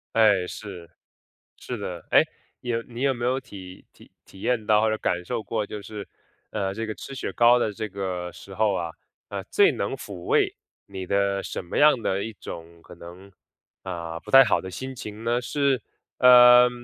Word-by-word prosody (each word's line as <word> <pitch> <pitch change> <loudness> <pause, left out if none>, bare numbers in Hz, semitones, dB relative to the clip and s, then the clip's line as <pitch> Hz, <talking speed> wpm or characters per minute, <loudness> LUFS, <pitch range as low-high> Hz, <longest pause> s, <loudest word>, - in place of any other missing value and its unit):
哎， 105 -5 +4
是， 90 -6 -9 0.7
是 - - -6
的。 - - -6
哎， - - +7 0.4
你 120 - -7
有 115 -1 0
你 120 +1 -9
有 135 -1 +2
没 120 -1 -4
有 130 +2 +1
体 95 -7 -12
体 - - -19 0.2
体 95 - -16
验 120 -4 0
到 105 -1 +4
或 110 - +2
者 110 - -1
感 90 -3 -1
受 110 - -3
过 105 0 -2
就 105 0 -7
是， 105 -1 -8 0.4
呃， 95 -2 -2
这 115 +2 -4
个 110 -1 -5
吃 135 - -9
雪 135 - -4
糕 120 +1 +5
的 105 -3 -1
这 110 +1 -5
个 90 -2 -4
时 95 - -12
候 105 -1 +2
啊， 85 -2 -2 0.4
呃， - - -5
最 - - +4
能 - - -3
抚 100 - -9
慰 - - +2 0.3
你 95 -2 -7
的 100 +1 0
什 - - -5
么 85 - -5
样 145 -5 +5
的 95 -1 -1
一 115 - -5
种 85 0 -10
可 - - -14
能， 90 +3 -12 0.5
啊， 85 -1 -5
不 - - -11
太 135 - +10
好 105 - +1
的 95 - -8
心 130 +6 -6
情 110 -1 -8
呢？ 120 +1 +1
是 135 -1 0 0.4
呃， 125 0 +8
105 Hz, 215 characters per minute, -25 LUFS, 95-120 Hz, 0.7 s, 太